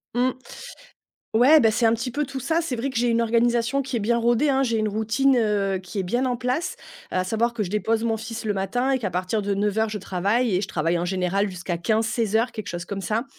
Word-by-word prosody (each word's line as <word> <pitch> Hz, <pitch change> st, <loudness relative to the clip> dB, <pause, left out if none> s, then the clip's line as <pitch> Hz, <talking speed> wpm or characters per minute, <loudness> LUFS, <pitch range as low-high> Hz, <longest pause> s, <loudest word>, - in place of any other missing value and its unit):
Mmh. 250 Hz, +1 st, +2 dB, 1.0 s
Ouais, 280 Hz, +7 st, +7 dB
beh, 225 Hz, -, +4 dB
c'est 230 Hz, +2 st, +1 dB
un 225 Hz, -, +5 dB
petit 235 Hz, +2 st, -2 dB
peu 295 Hz, +4 st, -2 dB
tout 275 Hz, -1 st, -6 dB
ça, 320 Hz, +6 st, 0 dB
c'est 315 Hz, -7 st, -2 dB
vrai 245 Hz, +4 st, -2 dB
que 255 Hz, -, -4 dB
j'ai 240 Hz, +1 st, +2 dB
une 235 Hz, 0 st, +2 dB
organisation 235 Hz, +3 st, +1 dB
qui 260 Hz, -2 st, -4 dB
est -, -, +1 dB
bien 235 Hz, +3 st, +1 dB
rodée, 240 Hz, +5 st, +2 dB
hein, 270 Hz, 0 st, +2 dB
j'ai 230 Hz, -3 st, 0 dB
une 215 Hz, -1 st, 0 dB
routine, 230 Hz, +5 st, +2 dB
heu, 205 Hz, -4 st, +1 dB
qui 185 Hz, +2 st, -6 dB
est -, -, 0 dB
bien 240 Hz, +8 st, 0 dB
en 250 Hz, -1 st, 0 dB
place, 255 Hz, +9 st, -2 dB, 0.4 s
à 185 Hz, 0 st, 0 dB
savoir 230 Hz, +5 st, 0 dB
que 225 Hz, -, -3 dB
je 185 Hz, -, -2 dB
dépose 220 Hz, +2 st, 0 dB
mon 225 Hz, -1 st, 0 dB
fils 225 Hz, 0 st, -6 dB
le 210 Hz, -, 0 dB
matin 245 Hz, +7 st, -1 dB
et -, -, +2 dB
qu'à 205 Hz, -6 st, -3 dB
partir 185 Hz, +4 st, -1 dB
de 200 Hz, 0 st, 0 dB
09:00 210 Hz, +2 st, 0 dB
je 210 Hz, -1 st, -4 dB
travaille 200 Hz, +4 st, 0 dB
et -, -, +2 dB
je -, -, -3 dB
travaille 165 Hz, +2 st, 0 dB
en 175 Hz, -, -2 dB
général 190 Hz, +2 st, 0 dB
jusqu'à 180 Hz, -2 st, -4 dB
15:00-16:00 220 Hz, +3 st, 0 dB
quelque 215 Hz, -3 st, -6 dB
chose 175 Hz, 0 st, -5 dB
comme 195 Hz, 0 st, -5 dB
ça, 220 Hz, +6 st, -1 dB
225 Hz, 250 wpm, -24 LUFS, 200-245 Hz, 1.0 s, Ouais